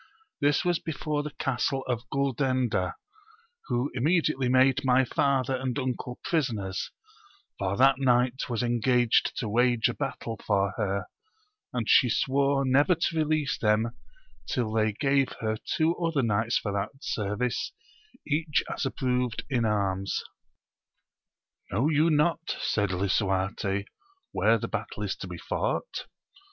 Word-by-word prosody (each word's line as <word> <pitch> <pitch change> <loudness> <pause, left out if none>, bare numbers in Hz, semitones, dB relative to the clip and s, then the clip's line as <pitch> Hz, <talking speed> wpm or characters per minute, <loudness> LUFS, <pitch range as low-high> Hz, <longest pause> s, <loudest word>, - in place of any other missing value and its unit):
This 145 +3 +2
was 175 -2 +2
before 155 -2 -2
the 150 - -5
Castle 135 +1 -1
of 120 0 -3
Guldenda, 130 -7 0 0.7
who 125 +4 0
imme" 155 +8 +3
cUately 135 -4 0
made 130 0 +4
my 130 0 +4
father 135 +1 +1
and 130 -1 -2
uncle 125 -1 -3
prisoners, 115 - -1 0.7
for 100 0 -1
that 135 +1 +5
knight 125 -1 +2
was 120 -1 -1
engaged 120 0 +2
to 120 - -2
wage 120 +1 +3
a - - -2
battle 115 - -4
for 100 -2 +1
her, 100 -3 -1 0.7
and 120 -3 -2
she 125 - +6
swore 140 +3 +2
never 145 +7 +4
to 165 0 -1
release 155 -2 0
them 110 +1 +2 0.6
till 120 -4 -1
they 110 -1 +2
gave 135 +3 +1
her 110 -1 -2 0.2
two 160 +2 +2
other 165 -5 0
knights 110 +1 +1
for 105 - -3
that 100 0 -1
service, 105 +4 -2 0.5
each 150 0 +1
as 135 - -1
approved 125 -3 -1
in 120 -3 +2
arms. 100 -2 0 1.5
Know 120 +11 +2
you 155 +1 +3
not, 165 +2 +1
said 105 -2 0
lisuarte, 95 +1 0 0.5
where - - +3
the - - -4
battle - - -4
is - - -2
to - - -7
be - - -7
fought - - -3
125 Hz, 140 wpm, -27 LUFS, 110-140 Hz, 1.5 s, she